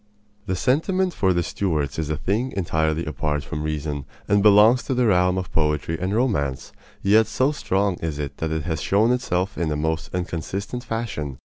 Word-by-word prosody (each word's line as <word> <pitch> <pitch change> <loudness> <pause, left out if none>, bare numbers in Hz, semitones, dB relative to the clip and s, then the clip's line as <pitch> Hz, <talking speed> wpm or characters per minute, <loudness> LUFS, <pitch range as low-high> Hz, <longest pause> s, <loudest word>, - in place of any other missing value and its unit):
This 95 -1 -1
sentiment 180 +7 +1
for 95 -2 +2
the 85 -1 +1
Stuarts 80 -7 -2
is 80 -2 -2
a 75 - -1
thing 105 - -1
entirely 80 -3 0
apart 75 -1 -2
from 75 - -5
reason 75 -2 -3 0.2
and 100 0 +3
belongs 105 +4 +6
to 130 - -1
the 125 0 +2
realm 90 -3 +3
of 95 -1 -4
poetry 75 0 0
and 95 +1 -1
romance; 70 - 0 0.3
yet 105 +2 +5
so 130 +6 +1
strong 100 - 0
is 80 -3 -3
it 75 -2 -5
that 80 - -2
it 80 -1 -2
has 80 0 -2
shown 110 +4 +3
itself 100 -6 -1
in 85 -2 0
the 75 - -1
most 80 +1 -2
inconsistent 95 +7 -4
fashion. 100 - -4
90 Hz, 190 wpm, -23 LUFS, 75-110 Hz, 0.3 s, belongs